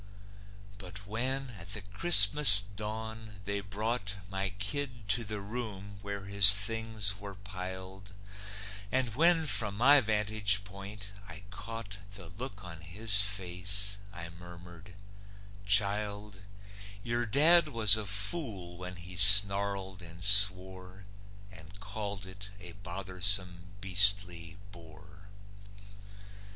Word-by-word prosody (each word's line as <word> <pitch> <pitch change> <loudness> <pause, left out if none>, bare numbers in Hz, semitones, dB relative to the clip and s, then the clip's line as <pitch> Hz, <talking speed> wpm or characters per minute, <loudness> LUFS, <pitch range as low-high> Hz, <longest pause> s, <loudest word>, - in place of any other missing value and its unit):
But 100 +1 -11
when, 130 +5 -4
at 90 +4 -11
the 105 - -5
Christmas 100 - +7
dawn, 110 +1 -8
they 100 0 -4
brought 105 +2 -5 0.2
My 95 0 -4
kid 115 +3 -6
to 115 +3 -1
the 105 -2 -7
room 100 -3 -9
where 100 -1 -8
his 100 0 +8
things 110 -1 -4
were 100 -1 -11
piled, 95 0 -11 0.8
And 130 -4 -1
when, 165 +4 +2
from 105 -8 -1
my 140 +5 +4
vantage 105 -2 -1
point, 100 +1 -11 0.2
I 90 +2 -12
caught 110 -2 -10 0.2
The 95 -4 -10
look 100 0 -10
on 85 -2 -12
his 100 +4 +1
face, 100 +1 -2
I 85 -4 -10
murmured: 85 +1 -15 0.7
"Child, 105 0 -1 0.6
Your 120 0 -4
dad 155 +8 +3
was 110 -7 +3
a 110 -2 -5
fool 100 - -4
when 90 0 -10
he 90 +1 -12
snarled 100 0 +5
and 85 0 -13
swore, 95 -2 0 0.5
And 95 +1 -17
called 100 -1 -8
it 100 +2 -13
a - - -11
bothersome, 95 -1 -4
beastly 95 -3 0
bore." 95 +4 -17
100 Hz, 115 wpm, -28 LUFS, 95-105 Hz, 0.8 s, his